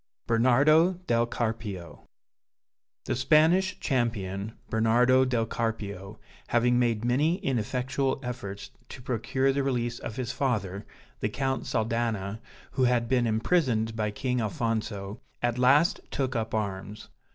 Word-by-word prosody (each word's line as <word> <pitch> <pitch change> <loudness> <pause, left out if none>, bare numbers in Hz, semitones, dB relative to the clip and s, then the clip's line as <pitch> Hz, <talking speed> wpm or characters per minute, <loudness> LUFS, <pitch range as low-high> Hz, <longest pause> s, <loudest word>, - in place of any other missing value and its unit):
BERNARDO 140 +9 +4
DEL 120 -6 +2
CARPIO 105 -9 -4 1.0
(The - - -1
Spanish 160 +8 +3
champion, 110 -5 -1
Bernardo 120 +4 +4
del 120 -3 0
Carpio, 105 -3 -4 0.3
having 120 +1 +3
made 115 -2 +1
many 145 +8 +2
ineffectual 130 +2 -1
efforts 100 -5 -6 0.2
to 125 - -9
procure 130 +3 0
the 140 - 0
release 120 -3 -1
of 110 - -6
his 125 -3 -3
father, 105 -7 -2 0.3
the 105 - -1
Count 135 +4 -2
Saldana, 110 -2 -1 0.3
who 130 - +1
had 120 -1 +2
been 125 -1 +2
imprisoned 115 -1 +1
by 105 -1 -1
King 125 +4 -1
Alfonso, 110 -3 -3 0.2
at 120 0 0
last 145 +9 +4
took 130 -2 -2
up 110 -1 -2
arms. 100 0 -4
120 Hz, 125 wpm, -27 LUFS, 110-130 Hz, 1.0 s, BERNARDO